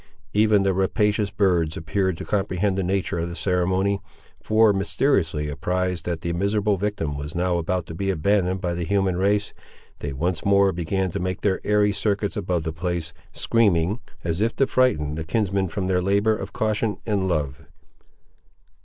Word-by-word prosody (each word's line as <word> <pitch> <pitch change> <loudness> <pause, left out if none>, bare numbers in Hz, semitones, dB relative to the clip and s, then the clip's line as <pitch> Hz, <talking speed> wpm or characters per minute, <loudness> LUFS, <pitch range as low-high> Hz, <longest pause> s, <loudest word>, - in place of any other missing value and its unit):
Even 105 -1 +4
the 95 -1 +2
rapacious 105 +2 +1
birds 90 -6 +1
appeared 95 +2 -1
to - - -6
comprehend 100 -1 0
the 95 - 0
nature 95 -2 -1
of 85 +1 -2
the 85 - -6
ceremony, 95 +3 +1 0.4
for, 110 -1 +4
mysteriously 95 - +1
apprised 90 +3 -2
that 85 -2 -3
the 85 0 -2
miserable 100 +3 +1
victim 95 -7 -2
was 75 +2 -6
now 90 0 +1
about 90 +1 -1
to 80 - -8
be 95 +4 -2
abandoned 95 +1 +1
by 90 -1 -2
the 85 0 -3
human 95 0 +1
race, 100 +3 +1 0.5
they 75 - -4
once 85 +6 -2
more 100 -1 +4
began 90 +2 -1
to - - -3
make 90 +1 -3
their 95 -2 +1
airy 105 0 +3
circuits 100 0 -1
above 90 -5 -1
the 80 0 -3
place, 85 0 -3 0.2
screaming, 100 -2 +2 0.2
as 85 +2 -1
if 115 +1 +1
to 135 - +3
frighten 80 - +1
the 80 +1 -4
kinsmen 95 +2 0
from 95 +3 -3
their 90 -1 +1
labour 100 +4 +2
of - - -6
caution 110 0 -1
and 100 -4 0
love. 70 -6 -2
95 Hz, 175 wpm, -24 LUFS, 85-100 Hz, 0.5 s, Even